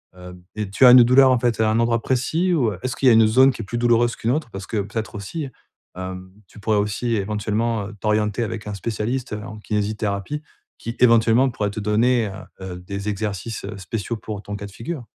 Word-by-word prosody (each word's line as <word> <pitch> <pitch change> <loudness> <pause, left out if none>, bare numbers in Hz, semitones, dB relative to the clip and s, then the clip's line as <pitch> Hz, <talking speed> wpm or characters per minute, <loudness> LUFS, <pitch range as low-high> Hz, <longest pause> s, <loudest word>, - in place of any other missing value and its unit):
heu 90 0 -11 0.2
et 105 -2 -3
tu 115 +6 +4
as 125 - +10
une 125 - +10
douleur, 130 +2 +6
en 125 - +3
fait, 115 -2 0
à 110 -1 +3
un 110 - +1
endroit 115 -1 +1
précis 160 +8 0
ou 120 -10 +1
est-ce 130 -1 -2
qu'il 135 - +1
y - - +9
a - - +6
une 110 0 +6
zone 130 +5 +5
qui 115 - -7
est - - -9
plus 120 +4 -4
douloureuse 120 0 +3
qu'une 115 - -3
autre? 145 -4 -2
Parce 95 0 -7
que, 110 - -3
peut-être, 105 +3 -4
aussi, 130 - -5 0.5
hem, 95 0 -7 0.2
tu 105 - -15
pourrais 105 +1 +1
aussi 105 +3 -1
éventuellement, 105 +1 -1
heu, 105 - -10
t'orienter 105 +1 0
avec 110 -1 -5
un 105 - -4
spécialiste 115 +4 -3
en 105 0 -6
kinésithérapie 105 +5 -3 0.3
qui, 115 +1 -6
éventuellement, 115 +2 +5
pourrait 105 -4 -2
te 105 - -5
donner, 110 +3 +2 0.3
heu 95 -1 -6
heu, 90 - -9
des 100 +3 -5
exercices, 105 +1 -4
heu, 105 +2 -6
spéciaux 110 +5 -4
pour 105 -1 -7
ton 105 - -6
cas 100 0 -7
de - - -13
figure. 125 - -6
110 Hz, 225 wpm, -22 LUFS, 105-120 Hz, 0.5 s, as